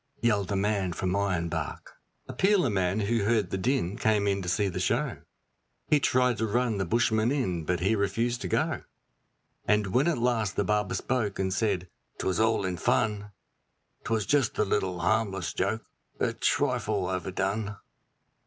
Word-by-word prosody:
yelled 105 -5 +1
the 100 - -2
man 100 -2 0
from 90 +2 -2
Ironbark. 85 -6 -2 0.4
A - - -6
peeler 190 - +3
man 95 +1 0
who 110 +1 +1
heard 105 -3 +1
the - - 0
din 110 -3 0
came 110 -3 +2
in 100 -1 +1
to 90 - -3
see 100 +3 +1
the 90 -1 -3
show; 120 +9 0 0.7
He 150 - +5
tried 125 -3 +2
to 110 - +1
run 115 -1 0
the 95 - 0
bushman 115 +2 +2
in, 90 - -1
but 90 +1 -1
he 100 +5 +2
refused 115 +4 0
to 95 - -3
go. - - 0 0.9
And 105 0 +3
when 135 +6 +3
at 170 - +1
last 115 -5 0
the 100 - +1
barber 105 0 0
spoke, 120 -7 -1
and 95 -1 -1
said, 95 -3 0 0.3
''Twas 95 +1 -1
all 110 -3 +2
in 90 -1 -2
fun 105 +3 0 0.7
'Twas 110 -2 0
just 140 -5 +1
a - - +2
little 95 -3 -1
harmless 95 -1 0
joke, 110 +4 -1 0.3
a - - +1
trifle 100 -4 0
overdone.' 95 +3 -2
105 Hz, 170 wpm, -28 LUFS, 95-115 Hz, 0.9 s, He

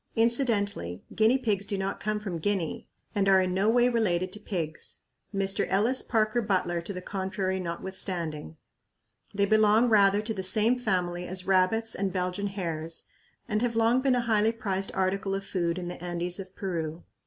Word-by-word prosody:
Incidentally 225 - +1
guinea 220 +4 +4
pigs 215 -6 0
do 200 0 -3
not 195 0 -3
come 215 0 -1
from 190 -5 -4
Guinea 185 -2 -2 0.3
and 195 -1 +2
are 190 -1 +6
in 185 -1 0
no 195 +3 +2
way 245 +1 +4
related 190 -6 +1
to 210 - -5
pigs 170 -7 -5 0.3
Mr. 195 -1 0
Ellis 220 +7 +2
Parker 220 +1 +1
Butler 185 -5 0
to 170 - -6
the 180 -2 -6
contrary 190 -1 -2
notwithstanding! 170 - -3 0.7
They 200 0 +1
belong 215 +3 +4
rather 205 -1 +4
to 220 +1 -1
the 195 - -4
same 215 +6 +3
family 180 -5 -1
as 185 0 -3
rabbits 195 +4 +2
and 195 -1 -1
Belgian 185 +2 -2
hares 165 -5 -4 0.4
and 215 -2 0
have 240 -2 0
long 230 +3 +3
been 265 -1 +3
a 245 - +2
highly 220 -1 +2
prized 195 -4 -2
article 195 +1 0
of 195 0 -4
food 170 -2 -1
in 180 -1 -4
the 175 0 -7
Andes 175 +1 -2
of 190 -1 -9
Peru. 165 -4 -4
195 Hz, 175 wpm, -28 LUFS, 180-215 Hz, 0.7 s, are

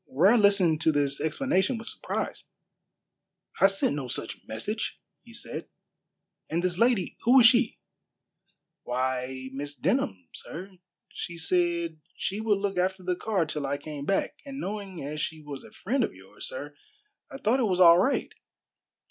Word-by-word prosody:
Ware 180 - +5
listened 200 -7 +4
to 160 - +4
this 140 -2 0
explanation 190 - +1
with 225 - -8
surprise. - - -3 1.1
"I 195 - +8
sent 195 -7 +1
no 140 -3 -4
such - - -2
message," - - -3 0.2
he - - -16
said; - - -6 0.8
"and 170 +2 0
this 180 0 0
lady, 230 -5 +2
who 245 +3 +5
was 250 - +8
she?" 240 -1 +5 1.0
"Why, 130 +1 -2
Miss 145 +1 -5
Denham, 120 - 0
sir. 185 +5 -7 0.4
She 170 - -6
said 170 -1 0
she 200 +3 -2
would 215 -2 +2
look 195 -2 -1
after 185 +1 0
the 180 0 0
car 190 -2 0
till 150 -2 -3
I 140 +1 -1
came 145 -1 -7
back, 195 - 0
and 275 -1 -7
knowing 195 - -5
as 150 +1 -4
she 160 +1 -3
was 145 -2 -8
a - - -12
friend 250 +6 -1
of - - -3
yours, - - -8
sir, - - -7 0.5
I 275 - -7
thought 255 0 +2
it 245 - +3
was 180 -1 +1
all 170 -1 +9
right." 260 +9 +1
180 Hz, 165 wpm, -28 LUFS, 150-210 Hz, 1.1 s, all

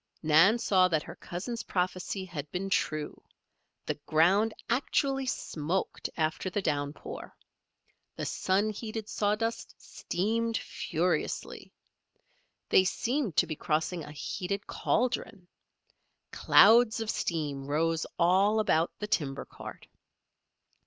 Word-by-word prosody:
Nan 165 +9 +6
saw 185 -5 +4
that 160 -4 0
her - - -9
cousin's 210 +6 -5
prophecy 185 -1 -2
had 150 -5 -6
been 195 +2 -3
true; 155 -4 -1 0.6
the - - -1
ground 190 +8 +4 0.2
actually 270 +1 0
smoked 170 -5 -2
after 160 +3 -1
the 195 - -1
downpour. 145 -5 -4 0.8
The - - -4
sun 200 +3 +1
heated 215 0 -6
sawdust 220 +2 -1
steamed 225 +5 -2
furiously. - - -2 1.0
They 185 - +6
seemed 230 - -1
to - - +4
be 155 -2 -4
crossing 160 +3 -1
a 150 - -9
heated 190 +7 -4
cauldron. 225 -6 -1 0.8
Clouds 230 0 +6
of 225 -1 -1
steam 145 -5 -3
rose 160 +2 0
all 190 +5 +4
about 165 -6 +2
the 210 - -4
timber 140 -8 -1
cart. - - -10
185 Hz, 110 wpm, -29 LUFS, 160-220 Hz, 1.0 s, Nan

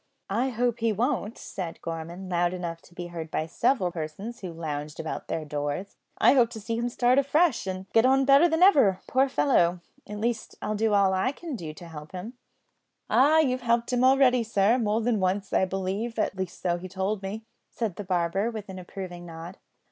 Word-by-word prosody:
"I 240 +6 +1
hope 240 -1 0
he 230 -1 +2
won't," 230 0 -1
said 175 -4 -6
Gorman, 170 +3 -6
loud 175 0 +1
enough 170 -2 -5
to 175 - -20
be 175 -1 -5
heard 160 -2 -5
by 155 - -1
several 185 +2 +1
persons 175 +8 -6
who 185 -3 -6
lounged 150 -2 -5
about 160 - -5
their 160 - -3
doors. 145 +6 -4 0.2
"I - - +6
hope 245 -4 +4
to 220 - -6
see 225 +2 -3
him 240 +1 -1
start 245 +2 +3
afresh, 280 - +2
an' 185 0 -4
git 225 - +5
on 265 +1 +4
better 280 +5 +6
than 320 +2 +3
ever, 270 - +5
poor 265 +2 +2
fellow; 180 -11 +2 0.3
at 210 - -5
least, 225 +1 -2
I'll 215 - -2
do 215 0 +1
all 195 -1 +4
I 190 +7 +1
can 315 0 -7
to 165 -3 -8
help 150 -1 -10
him." 185 +6 -6 0.8
"Ah! 305 +4 +5
you've 255 -4 0
helped 235 +1 +1
him 245 0 +2
already, 260 -1 +5
sir, 225 +1 +2
more 220 0 +1
than 225 -2 +1
once, 190 +1 -1
I - - +4
believe; 195 +5 -3
at 215 - 0
least 190 -2 -5
so 175 -1 +1
he 185 - -7
told 190 +2 -2
me," 205 +3 -5 0.3
said 215 -7 -3
the 205 - -4
barber, 185 +3 0
with 215 -4 -7
an 190 -1 -7
approving 180 -1 -8
nod. 165 +3 -9
200 Hz, 205 wpm, -27 LUFS, 175-240 Hz, 0.8 s, I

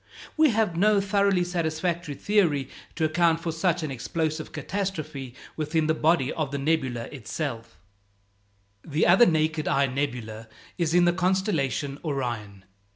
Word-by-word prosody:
We 315 -1 +5
have 220 -6 +1
no 205 +3 +4
thoroughly 200 -2 +2
satisfactory 170 -2 -2
theory 155 -9 +1 0.3
to 160 - +1
account 165 +1 +2
for 165 0 -3
such 170 +1 0
an 155 - -3
explosive 155 +5 -3
catastrophe 155 -10 -4 0.2
within 155 +1 0
the 155 - +2
body 160 -3 +2
of 155 -4 -2
the 140 - -3
nebula 135 -5 0
itself. 120 - -6 1.1
The 150 +1 0
other 190 +7 +6
naked 155 -1 +1
eye 140 - +3
nebula 125 -5 -4 0.3
is 170 -2 0
in 175 0 +5
the 175 - +3
constellation 175 - 0
Orion. 120 - -4
160 Hz, 140 wpm, -26 LUFS, 140-175 Hz, 1.1 s, other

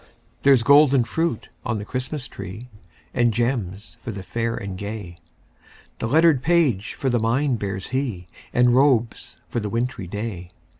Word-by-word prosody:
There's 135 -4 +5
golden 140 -1 +6
fruit 160 -1 -2
on 110 - -1
the 105 - -5
Christmas 130 +4 -4
tree, 110 +5 -8 0.4
And 120 -1 +3
gems 110 -4 -2
for - - -6
the 100 -3 -5
fair 115 +4 -2
and 100 -4 -5
gay; 100 -3 -6 0.8
The - - -1
lettered 155 0 +4
page 145 - +2
for 135 -2 -1
the 120 - +2
mind 120 +3 +1
bears 95 -2 -4
he, 125 -9 -2 0.3
And 125 0 +4
robes 125 -4 +2
for - - -2
the 105 -2 -3
wintry 115 -4 -2
day. 100 -3 -5
115 Hz, 155 wpm, -23 LUFS, 105-135 Hz, 0.8 s, golden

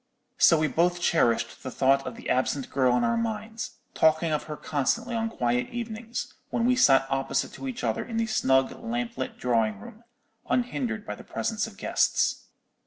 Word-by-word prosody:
"So 165 - +7
we 155 - +2
both 175 +3 +1
cherished 125 -9 +1
the 130 - -5
thought 135 +1 +2
of 125 - -5
the - - -9
absent 130 +1 0
girl 130 -2 +3
in - - +1
our 235 - +2
minds, 225 +2 -4 0.2
talking 160 +1 +3
of 150 - -1
her 150 -1 -6
constantly 230 - -1
on 225 -1 -1
quiet 125 - 0
evenings, 230 0 -5 0.2
when 235 - 0
we 250 +1 +4
sat 135 - +5
opposite 135 0 -1
to 275 - -7
each 255 -1 -5
other - - 0
in 230 -2 -5
the 230 - +2
snug 135 -12 +2
lamp 235 0 -3
lit 235 -3 -4
drawing 115 -4 +1
room, 215 - -12 0.5
unhindered 240 -3 -1
by - - -4
the - - -11
presence 220 -1 -2
of 205 -3 -13
guests. - - +1
200 Hz, 185 wpm, -27 LUFS, -, 0.5 s, So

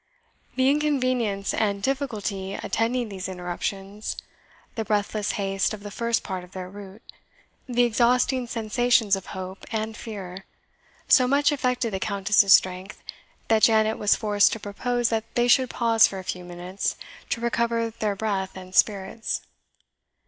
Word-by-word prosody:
The 260 0 +3
inconvenience 255 -8 +1
and 200 -2 0
difficulty 210 -8 -2
attending 235 +1 -1
these 190 -2 -5
interruptions, 195 +3 -4 0.6
the 225 - -3
breathless 210 0 -1
haste 195 +1 -1
of 200 - -14
the 205 - -7
first 235 +2 0
part 185 -2 -4
of 180 - -15
their 185 -1 -6
route, 200 +1 -11 0.7
the 245 0 +3
exhausting 245 +2 +2
sensations 230 -2 +2
of 195 - -8
hope 185 +1 -7
and 220 0 -2
fear, 195 -4 -8 0.6
so 255 -2 +6
much 285 +2 +3
affected 250 -5 -1
the 190 - -1
Countess's 200 -1 +2
strength, 185 +2 +3 0.4
that 220 -1 +3
Janet 220 -1 +4
was 210 - +4
forced 205 -2 +3
to 225 - -4
propose 240 +4 -1
that 225 -1 -3
they 240 0 +3
should 255 0 +4
pause 230 -2 +4
for 195 - -7
a 190 - -6
few 180 0 -4
minutes 175 +2 -4 0.3
to - - -1
recover 235 -1 0
breath 200 -3 -2
and 185 0 -10
spirits. 200 +3 +1
215 Hz, 145 wpm, -25 LUFS, 195-235 Hz, 0.7 s, so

